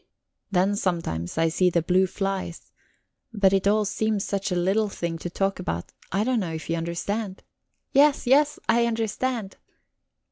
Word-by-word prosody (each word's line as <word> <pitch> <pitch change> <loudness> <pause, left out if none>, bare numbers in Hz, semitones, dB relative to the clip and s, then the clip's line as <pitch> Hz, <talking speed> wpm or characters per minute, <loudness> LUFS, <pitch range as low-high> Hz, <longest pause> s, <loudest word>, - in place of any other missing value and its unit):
"Then 195 +1 +2
sometimes 165 - -2
I 165 0 +3
see 180 +3 +3
the 170 -2 +1
blue 185 +2 +3
flies. 195 -2 -4 0.6
But 200 -3 +3
it 195 0 +2
all 210 +1 +3
seems 215 0 0
such 200 0 -2
a - - +1
little 195 +5 +1
thing 170 -3 -4
to 175 - -4
talk 195 +2 -1
about 85 - -4 0.2
I 195 +4 +1
don't 250 0 +1
know 175 -5 -3
if 160 +1 -5
you - - +1
understand?" 185 +5 -3 0.5
"Yes, 285 +1 +4
yes, 290 +4 +4
I 235 +1 +3
understand." 225 -1 -2
195 Hz, 165 wpm, -25 LUFS, 175-220 Hz, 0.6 s, Yes